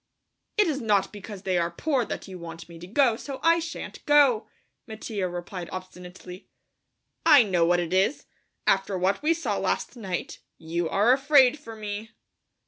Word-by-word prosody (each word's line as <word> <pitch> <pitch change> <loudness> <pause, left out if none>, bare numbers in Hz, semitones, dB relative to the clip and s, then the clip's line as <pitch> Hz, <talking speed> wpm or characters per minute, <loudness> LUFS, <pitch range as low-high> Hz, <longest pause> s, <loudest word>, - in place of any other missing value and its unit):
_" - - -54 0.6
"It 420 - +5
is 285 -4 -1
not 205 -3 +1
because 205 -1 -9
they 185 -2 +1
are 170 0 0
poor 265 - 0
that - - -6
you 185 -2 -9
want 165 -1 -9
me 170 -1 -12
to 175 - -10
go, 240 +2 +3
so 270 +3 -7
I 335 +1 +5
shan't 335 0 -7
go," 275 -7 +5 0.4
Mattia 215 -4 -4
replied 175 0 -6
obstinately. 185 0 -10 0.7
"I 285 -5 +7
know 180 -5 +2
what 175 0 +3
it 175 0 -3
is, 195 +9 +1 0.4
after 195 0 +1
what 190 +2 0
we 320 +3 +2
saw 330 - -2
last - - -2
night; 190 -7 -5 0.2
you 165 +1 -3
are 215 +5 +4
afraid 275 0 +4
for 225 -3 -10
me." 215 +1 -6
205 Hz, 175 wpm, -26 LUFS, 180-255 Hz, 0.7 s, I